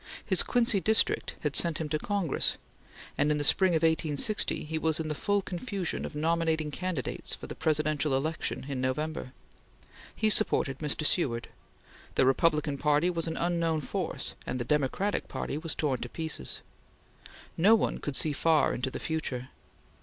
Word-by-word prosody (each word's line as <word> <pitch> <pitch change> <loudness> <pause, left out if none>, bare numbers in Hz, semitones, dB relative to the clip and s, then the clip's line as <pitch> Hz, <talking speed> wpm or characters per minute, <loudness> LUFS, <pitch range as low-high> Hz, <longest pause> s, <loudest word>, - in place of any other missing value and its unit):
His - - +4
Quincy 235 -5 +2
district 220 +3 +3
had 150 -2 -2
sent 170 -3 +5
him 160 - -3
to 155 0 -1
Congress, 195 -7 0 0.6
and 145 - +3
in 150 - +2
the 145 - -1
spring 185 +5 +4
of 160 - 0
1860 160 +4 +1
he 160 +1 -3
was 160 0 0
in 160 -1 -3
the - - -1
full 205 +5 0
confusion 190 -1 -4
of - - -8
nominating 160 0 0
candidates 180 -6 -3
for - - -10
the - - -7
Presidential 155 -2 0
election 155 -1 -3
in 135 -3 -3
November. 150 +1 -3 0.8
He 215 0 +2
supported 140 -11 +2
Mr. 155 0 +2
Seward. 125 -9 +2 0.7
The - - +4
Republican 150 +1 +2
Party 150 +4 +2
was 165 -1 -3
an 160 - -3
unknown 170 -2 0
force, - - -2
and 125 - -3
the - - -1
Democratic 150 - 0
Party - - -4
was 165 -1 -4
torn 135 -5 -1
to 125 - -5
pieces. 160 - -3 0.9
No 205 +7 +5
one 225 - -1
could 145 - -4
see 155 +2 +2
far 160 +1 +2
into 125 +2 -2
the - - -6
future. 130 -6 -4
155 Hz, 170 wpm, -29 LUFS, 145-170 Hz, 0.9 s, sent